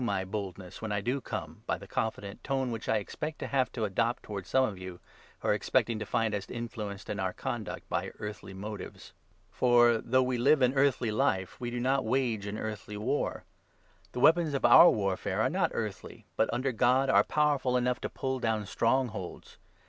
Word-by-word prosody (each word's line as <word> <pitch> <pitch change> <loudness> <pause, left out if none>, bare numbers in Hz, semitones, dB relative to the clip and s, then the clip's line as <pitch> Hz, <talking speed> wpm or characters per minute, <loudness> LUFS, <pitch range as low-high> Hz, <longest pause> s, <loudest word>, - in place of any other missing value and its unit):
343 100 -5 0
my - - -15
boldness," 95 -3 -6
when 110 -1 -4
I 105 - 0
do 125 +7 -1
come, - - -6
by - - 0
the - - -11
confident 105 -2 -4
tone 135 -2 -1
which 115 -1 -5
I 110 - +3
expect 150 +9 -5
to - - -5
have 130 -2 0
to 115 - -3
adopt 115 +4 0
towards 100 -3 -6
some 130 0 +4
of 100 -6 -5
you, 95 -1 -8 0.4
who - - -1
are - - +5
expecting 115 -2 +1
to 105 - -5
find 115 0 0
us 100 -1 -3
influenced 110 -4 -6
in 105 - -4
our 95 -1 -1
conduct 110 -6 -5
by - - -2
earthly 105 -2 -7
motives. 105 +1 -8 0.4
For, 120 -2 +4
though 130 +3 +2
we 125 -1 -1
live 140 +2 +4
an 125 +1 +4
earthly 135 -4 +2
life, 95 -3 0
we 120 - -2
do 120 0 -3
not 130 +2 +2
3 110 - -5
wage 115 -5 0
an 100 +1 -4
earthly 105 -2 -5
war. 110 +7 -1 0.7
The - - -4
weapons 160 +1 +4
for - - -1
our 120 +8 +9
warfare 100 -3 -1
are - - +2
not - - +1
4 - - -2
earthly, - - -6
but, - - +2
under 130 +2 0
God, 130 +3 +3
are - - +6
powerful 145 -4 +1
enough 125 0 0
to - - -3
pull 130 -1 -3
down 110 -3 0
strongholds. 115 -4 -2
115 Hz, 210 wpm, -30 LUFS, 105-130 Hz, 0.7 s, our